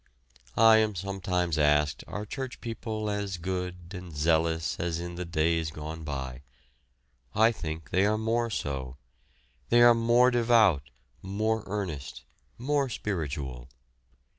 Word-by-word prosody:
I 110 0 +7
am 110 -2 +2
sometimes 90 -3 -1
asked 75 0 +2
are 105 - -5
church 130 +3 -6
people 110 -2 -4
as 100 -2 -2
good 90 0 -4
and 90 -2 -8
zealous 80 +1 +1
as 85 -1 -1
in 85 0 -5
the 90 +1 -5
days 80 0 +1
gone 80 +1 -7
by. 65 -4 -5 0.9
I 110 +2 +5
think 80 -6 -6
they 95 +3 +3
are 110 +1 +1
more 115 +2 0
so. 65 - -4 0.7
They 120 0 +6
are 120 0 +8
more 120 +2 +4
devout, 110 - +3 0.3
more 110 +4 -1
earnest, 90 -11 -4 0.3
more 140 +2 0
spiritual. 70 - -4
90 Hz, 130 wpm, -28 LUFS, 80-110 Hz, 0.9 s, are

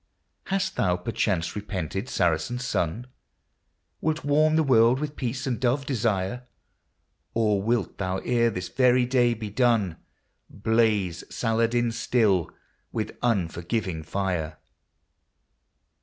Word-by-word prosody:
•j - - -26
Hast 190 0 -1
thou 90 -1 +2
perchance 90 -4 -1
repented, 100 - -4
Saracen 90 +7 0
Sun? 120 -3 -2 1.0
Wilt 160 +1 -1
warm 155 +2 +3
the 160 - +4
world 125 -2 +4
with 150 0 -4
peace 130 0 -3
and 125 -4 -1
dove 130 +2 +1
desire? 115 -2 -1 0.9
Or 105 -3 +2
wilt 115 0 -1
thou, 95 -1 -1
ere 120 -1 +3
this 90 -4 -4
very 125 +1 +3
day 120 -2 +2
be 105 -2 -6
done, 110 -7 +2 0.5
Blaze 105 -5 +1
Saladin 115 +1 +1
still, 110 -7 +1 0.4
with - - -3
unforgiving 90 -4 -1
fire 90 -2 -2
115 Hz, 115 wpm, -26 LUFS, 95-125 Hz, 1.0 s, the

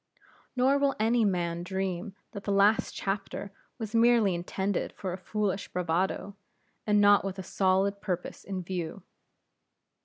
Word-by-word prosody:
Nor 265 +3 +3
will 280 -1 +2
any 230 +2 +3
man 175 -4 0
dream 190 +1 -3 0.2
that 200 - -7
the 205 - 0
last 200 +2 +3
chapter 195 0 -3 0.3
was 220 -3 -6
merely 230 -4 +5
intended 190 +3 -2
for 185 -3 -4
a - - -4
foolish 200 0 -2
bravado, 180 +3 -1 0.5
and 210 0 +4
not 205 0 +6
with 195 -1 -4
a 190 - -5
solid 195 +2 +1
purpose 180 -3 -4
in 190 -2 -4
view. 175 0 -4
195 Hz, 145 wpm, -29 LUFS, 185-210 Hz, 0.5 s, not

